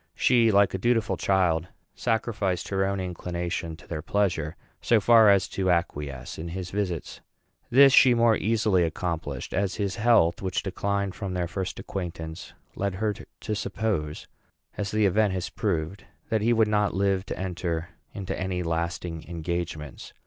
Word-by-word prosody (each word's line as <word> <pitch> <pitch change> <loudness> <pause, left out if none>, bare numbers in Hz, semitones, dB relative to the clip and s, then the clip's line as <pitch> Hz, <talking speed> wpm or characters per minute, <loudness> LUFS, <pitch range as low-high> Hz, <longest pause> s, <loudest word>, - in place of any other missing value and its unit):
She, 120 -3 +4
like 100 -1 +4
a 95 - -2
dutiful 115 +1 +1
child, 90 -4 +1 0.3
sacrificed 110 -5 -1
her 95 -1 +1
own 100 0 -1
inclination 85 -2 -4
to - - -17
their 80 -2 -4
pleasure 85 -4 0 0.3
so 115 - +4
far 110 +1 +6
as 100 -1 +4
to 95 -1 -1
acquiesce 75 -7 -2
in 80 - -5
his 90 +1 -5
visits. 95 -5 -3 0.5
This 135 +2 +7
she 130 -2 +7
more 115 -1 +4
easily 105 -4 +2
accomplished, 80 -5 -3
as 100 +1 0
his 100 -2 -2
health, 105 -7 +3
which 95 -1 -2
declined 100 0 -2
from 95 -4 -5
their 90 -1 -1
first 95 +1 -4
acquaintance, 85 -2 -6 0.2
led 100 -1 -2
her 105 +2 0
to 110 0 -7
suppose, 100 -8 -2 0.5
as 100 -1 -3
the 110 +1 +2
event 100 +1 +3
has 90 -1 -3
proved, 90 -2 -2 0.2
that 110 -1 +1
he 115 +3 +2
would 110 -2 +4
not 105 -3 +1
live 95 -1 +1
to - - -4
enter 85 -2 -3 0.2
into 95 -2 -4
any 90 -1 -2
lasting 85 0 -3
engagements. 85 -3 -5
95 Hz, 160 wpm, -26 LUFS, 85-105 Hz, 0.5 s, This